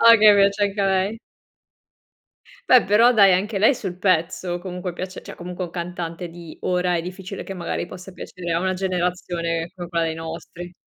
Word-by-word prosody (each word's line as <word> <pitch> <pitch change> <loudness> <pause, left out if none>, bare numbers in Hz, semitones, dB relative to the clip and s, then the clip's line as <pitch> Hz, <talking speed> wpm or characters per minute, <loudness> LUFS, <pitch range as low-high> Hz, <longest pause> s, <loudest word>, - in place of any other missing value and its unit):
Ah 230 0 +9
okay, 210 -2 +7
piace 200 +1 +3
anche 200 0 0
a 195 - +2
lei. 195 +3 +1 1.5
Beh 255 -1 +7
però 225 +5 +5
dai, 200 -4 +6
anche 200 +2 -1
lei 220 +7 +5
sul 185 -5 -6
pezzo 175 -1 0
comunque 180 -1 -5
piace, 185 +1 -6
cioè, - - -10
comunque 180 +1 -6
un 170 - -8
cantante 175 -1 -5
di 170 -1 -11
ora 180 -1 +1
è 165 - -1
difficile 185 +2 -7
che - - -6
magari 175 -2 -3
possa 185 +2 -10
piacere 180 -1 -6
a 165 - +2
una 185 0 0
generazione 175 -2 -2
come 175 -2 -6
quella 170 -1 0
dei 160 - -2
nostri. 165 +2 -8
180 Hz, 190 wpm, -22 LUFS, 175-195 Hz, 1.5 s, Ah